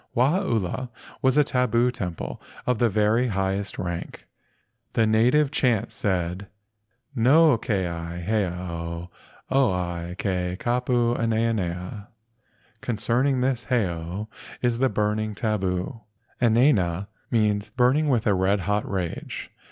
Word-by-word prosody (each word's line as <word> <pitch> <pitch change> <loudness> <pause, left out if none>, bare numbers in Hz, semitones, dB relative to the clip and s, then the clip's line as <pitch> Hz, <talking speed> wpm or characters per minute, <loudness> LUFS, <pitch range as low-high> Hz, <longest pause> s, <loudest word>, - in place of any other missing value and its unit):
Wahaula 125 - +1 0.3
was 130 +1 +3
a 150 - +7
tabu 125 -2 +2
temple 90 -8 -5 0.2
of 125 -3 +1
the 120 - +4
very 110 +4 +2
highest 95 -1 -1
rank. 85 -1 -5 0.7
The 115 - +3
native 125 +7 +3
chants 120 -7 +1
said, 95 -3 -1 0.7
"No 140 +5 +5
keia 85 -5 -2
heiau 90 -4 -2 0.4
oia 90 -9 0
ke 90 -2 -2
kapu 120 0 +1
enaena." 105 -4 -1 0.7
("Concerning 125 +3 +1
this 125 -3 0
heiau 95 -4 -1 0.4
is 120 -1 +1
the 130 0 +3
burning 105 0 -1
tabu.") 95 -2 -1 0.4
"Enaena" 110 - +3 0.2
means 105 -3 +1
"burning 135 +4 +2
with 120 -5 +2
a 105 - +4
red 95 +1 +2
hot 105 +4 -1
rage." 90 -4 -4
110 Hz, 110 wpm, -25 LUFS, 90-125 Hz, 0.7 s, a